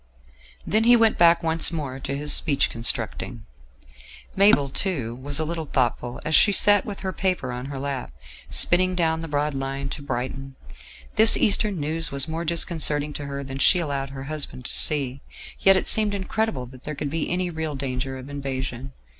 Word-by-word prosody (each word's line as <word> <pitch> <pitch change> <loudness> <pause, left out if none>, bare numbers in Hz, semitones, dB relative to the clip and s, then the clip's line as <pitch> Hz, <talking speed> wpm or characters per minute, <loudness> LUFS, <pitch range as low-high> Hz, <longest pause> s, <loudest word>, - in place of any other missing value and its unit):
Then 220 +2 +1
he 240 +1 +7
went 225 -2 +3
back 170 0 +5
once 165 +1 0
more 140 -5 -5
to 140 +1 -4
his 150 +1 0
speech 145 -4 +1
constructing. 115 0 -2 0.9
Mabel, 195 -8 +5
too, 135 - -2
was 140 +3 -4
a 155 - 0
little 165 -1 -4
thoughtful 120 -2 -1
as 160 - -2
she 205 - +6
sat 205 +1 +5
with 200 -2 -6
her 190 -1 -3
paper 180 -9 -2
on 125 +1 -6
her 140 -1 -6
lap, 135 - -4 0.4
spinning 185 +1 +2
down 160 -2 0
the 165 - -6
broad 150 0 -1
line 135 0 -4
to 145 - -6
Brighton. 135 0 -5 0.6
This 220 +1 +8
Eastern 205 -2 +2
news 155 +1 -2
was 140 +1 +1
more 165 +1 -4
disconcerting 155 -3 +1
to 145 - -6
her 140 0 -5
than 135 0 -7
she 140 +7 +5
allowed 140 -5 -3
her 135 -1 -8
husband 140 -3 -4
to - - -5
see; 140 -3 0 0.4
yet 195 0 +5
it - - -1
seemed 210 -2 +4
incredible 195 - -2
that 130 +1 -14
there 150 - -5
could 140 0 -4
be 165 -1 -2
any 180 0 -1
real 160 -2 -4
danger 130 0 -4
of 130 +1 -10
invasion. 135 -2 -5
145 Hz, 190 wpm, -24 LUFS, 135-170 Hz, 0.9 s, This